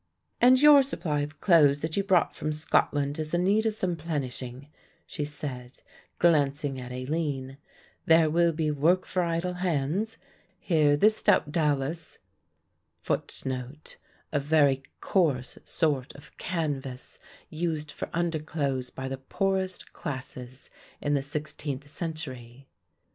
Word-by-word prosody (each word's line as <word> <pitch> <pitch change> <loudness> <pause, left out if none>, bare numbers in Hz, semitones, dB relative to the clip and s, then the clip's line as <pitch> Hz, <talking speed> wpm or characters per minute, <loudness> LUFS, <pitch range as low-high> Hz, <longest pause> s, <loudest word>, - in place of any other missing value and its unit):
"And 255 +1 +7
your 295 0 +8
supply 165 - -2
of 145 +1 -4
clothes 145 -6 +5
that 160 0 -2
you 200 - +1
brought 190 -3 +3
from 155 - -2
Scotland 145 -1 +1
is 155 +2 -2
in 175 - +1
need 210 +4 +3
of 220 - 0
some 185 -4 -1
plenishing," 135 -4 -5 0.4
she 150 - -4
said, 135 -4 -6 0.4
glancing 145 -4 +2
at 125 0 -8
Aline. 135 0 -3 0.5
"There 160 -1 +6
will 170 +2 +3
be 155 -1 -1
work 165 +6 +2
for 185 - -1
idle 170 +1 -1
hands. 180 +4 -1 0.4
Here, 150 -4 +3
this 215 +6 +5
stout 185 -7 +3
dowlas 150 0 -1 0.9
will - - +1
stand 135 - -2
wear - - -1
well, - - -7
and - - -12
be - - -26
warmer - - -37
too." - - -9 0.3
A 145 - +1
very 140 -2 +3 0.2
coarse 145 -10 +1
sort 140 -5 -1
of 140 - -15
canvas 145 -7 -4 0.3
used 155 -2 -2
for - - -6
underclothes 155 -6 -1
by 130 - -6
the 135 0 -5
poorest 190 +6 -2
classes 130 -2 -7 0.3
in 145 - -1
the 140 - +2
sixteenth 145 -1 -4
century. 135 -6 -6
150 Hz, 150 wpm, -27 LUFS, 135-170 Hz, 0.9 s, your